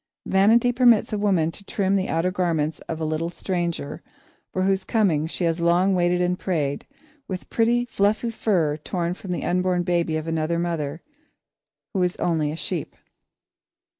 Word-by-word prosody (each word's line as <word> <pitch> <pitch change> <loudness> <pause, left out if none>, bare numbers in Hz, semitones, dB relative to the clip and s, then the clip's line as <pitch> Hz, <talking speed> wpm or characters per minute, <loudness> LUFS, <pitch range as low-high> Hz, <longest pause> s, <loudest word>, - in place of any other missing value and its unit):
Vanity 225 +5 +4
permits 240 -3 +4
a - - +1
woman 185 -6 +2
to 200 - -9
trim 195 -1 0
the 190 -1 0
outer 165 +3 +1
garments 165 -4 0
of 160 - -2
the 160 - -3
little 155 +2 -1
stranger 170 -4 -3 0.5
for 185 - -1
whose 190 0 +1
coming 175 -10 +1
she 175 - -2
has 165 0 0
long 175 +3 +3
waited 175 -1 +2
and 180 0 0
prayed, 150 -7 -2 0.4
with 185 -2 -6
pretty, 240 +1 +2
fluffy 220 +1 0
fur 175 -9 +1
torn 170 +2 -2
from 185 0 -8
the 175 - -2
unborn 180 0 +1
baby 170 -2 0
of 155 +1 -5
another 165 +1 0
mother 165 -3 -3 0.9
who 190 - 0
is 180 0 +1
only 160 -4 0
a - - -4
sheep. 170 -1 -4
180 Hz, 165 wpm, -24 LUFS, 165-195 Hz, 0.9 s, Vanity